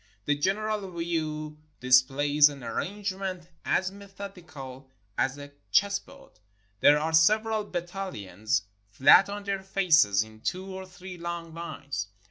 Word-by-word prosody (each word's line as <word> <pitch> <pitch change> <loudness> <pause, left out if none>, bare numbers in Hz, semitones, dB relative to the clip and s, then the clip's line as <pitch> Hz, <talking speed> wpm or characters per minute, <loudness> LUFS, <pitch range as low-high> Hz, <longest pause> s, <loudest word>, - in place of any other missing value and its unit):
The 145 - +3
general 205 +5 -1
view 155 -2 -3 0.2
displays 140 +4 +5
an 140 -3 -10
arrangement 190 - -4
as 185 0 +1
methodi 195 -2 -10
cal 130 -1 -9 0.3
as 135 +2 0
a 145 0 -10 0.2
chessboard. 200 - -1 0.4
There 145 +6 +6
are 160 +2 -1
several 215 +6 +3
battalions 170 - -3 0.3
flat 135 - +6
on 205 0 -5
their 200 -1 -2
faces 165 - +3
in 110 0 -15
two 185 +9 -2
or 190 0 -7
three 185 -1 -10
long 170 -1 -5
lines. 140 -10 -5
170 Hz, 125 wpm, -28 LUFS, 140-195 Hz, 0.4 s, There